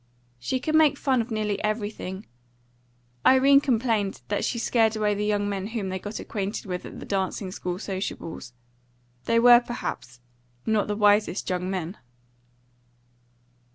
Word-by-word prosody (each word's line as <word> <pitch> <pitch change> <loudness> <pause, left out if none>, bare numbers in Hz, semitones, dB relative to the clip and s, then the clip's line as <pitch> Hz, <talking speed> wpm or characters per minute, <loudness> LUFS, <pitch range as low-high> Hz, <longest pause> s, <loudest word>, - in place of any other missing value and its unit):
She 195 - -2
could 310 +5 -2
make 310 -2 +5
fun 260 -4 +1
of 230 - -6
nearly 215 -2 -2
everything; 210 -2 -3 1.0
Irene 275 +2 +6
complained 225 -6 0
that 205 - -1
she 240 - -1
scared 225 -1 +2
away 210 -1 +1
the 205 +1 -2
young 205 -1 +1
men 200 -1 -3
whom 215 -4 -3
they 190 0 -3
got 205 +3 -6
acquainted 205 0 -4
with 180 -2 -5
at - - -10
the - - -8
dancing 190 0 -2
school 180 -1 -4
sociables. 185 - -5 0.7
They 230 - +2
were, 240 +1 +8
perhaps, 125 - -6 0.5
not 220 -2 +1
the 210 - -1
wisest 205 -2 +3
young 180 0 -2
men. 185 0 -4
210 Hz, 150 wpm, -25 LUFS, 190-230 Hz, 1.0 s, were